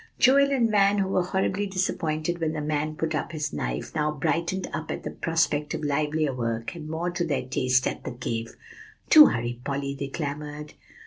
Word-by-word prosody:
'" - - -41
Joel 280 +2 +5
and 240 -5 +2
Van, 200 -1 +4
who 195 -1 +1
were 185 - +2
horribly 190 +2 -1
disappointed 170 -3 -1
when 160 -1 -1
the 155 - -3
man 155 +1 -1
put 160 0 -2
up 155 +2 -3
his 150 - -3
knife, 60 -4 -3
now 150 -1 +1
brightened 170 +5 -1
up 160 - -4
at - - -6
prospect 155 -3 +1
of - - -5
livelier 150 0 0
work, 115 -2 -3
and 155 -3 -8
more 165 +3 -2
to 175 0 -1
their 145 -6 -1
taste, 130 -1 +1
at - - -3
the - - -4
cave. 115 -2 -4 0.6
"Do 305 -1 +11
hurry, 120 0 -2
Polly!" 140 0 -2
they 140 0 -4
clamored. 150 +1 -5
155 Hz, 195 wpm, -26 LUFS, 140-175 Hz, 0.6 s, Do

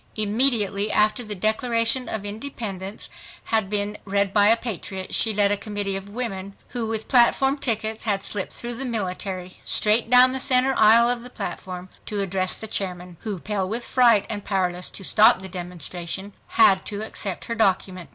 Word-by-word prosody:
Immediately 215 -2 +1
after 215 +4 +2
the 210 -2 -6
Declaration 230 +4 0
of 210 -2 -4
Independence 205 -3 -6 0.4
had 220 -4 0
been 205 0 -1
read 200 0 0
by 205 -1 +5
a 225 +2 +5
patriot, 190 -4 -6
she 225 - +3
led 205 -1 +2
a 205 - +1
committee 205 -1 -3
of 195 +1 -7
women, 200 -4 -5
who 235 -3 -3
with 220 -1 -3
platform 270 +2 +3
tickets 220 -4 -2
had 200 -3 0
slipped 200 -3 -2
through 240 0 -6
the 245 +3 -5
military, 190 -5 -4
straight 220 +2 +2
down 250 +1 +7
the 265 - -3
center 260 +1 +3
aisle 225 +2 +6
of 245 -1 0
the 245 - -10
platform 185 -6 -6 0.2
to 210 -2 -3
address 185 -1 0
the 220 - -5
chairman, 180 -4 -4
who 210 -3 -5
pale 195 +1 -3
with 235 +3 -3
fright 235 -5 +4
and 205 -2 -4
powerless 180 -2 -1
to 195 - -6
stop 215 +4 +5
the 190 - -8
demonstration 180 +1 -6
had 190 -1 +5
to 205 0 -4
accept 200 -4 -5
her 230 - -3
document. 190 -5 0
210 Hz, 180 wpm, -23 LUFS, 190-230 Hz, 0.4 s, down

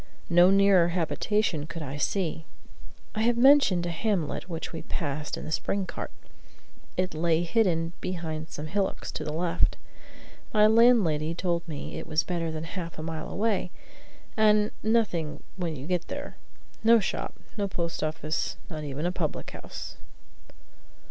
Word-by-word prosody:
No 175 +1 +7
nearer 195 -3 +5
habitation 175 -1 0
could 165 -1 -6
I 140 0 -5
see. 165 0 -1 0.7
I 215 - -1
have 235 +1 +3
mentioned 250 -9 +6
a 175 - -1
hamlet 185 -1 -1
which 165 -1 -5
we 160 - -4
passed 150 -2 -3
in - - -6
the 155 - -5
spring 195 +5 0
cart. - - -5 0.9
It 185 0 0
lay 165 +1 +2
hidden 170 -4 +1
behind 160 -3 -4
some 150 - -6
hillocks 190 +5 -2
to - - -4
the 150 - -3
left. 165 +2 +1 0.8
My 210 0 +7
landlady 215 -9 +4
told 170 -1 -1
me 150 -4 -5
it - - -8
was 155 0 +2
better 170 -2 -2
than 155 0 -4
half 170 -1 -6
a 155 - -5
mile 160 -1 -4
away, 205 -3 0 0.7
and 210 -1 +4
"nothing 210 -8 0
when 175 -4 -2
you 135 0 -7
get 180 0 -1
there; - - -6 0.5
no 230 +1 +7
shop; 195 - -3 0.2
no 205 -2 0
post 170 -3 -3
office; 155 0 -2
not 155 -1 -5
even 145 +2 -3
a 175 - +1
public 170 -4 -3
house." - - -8
170 Hz, 155 wpm, -28 LUFS, 160-200 Hz, 0.9 s, No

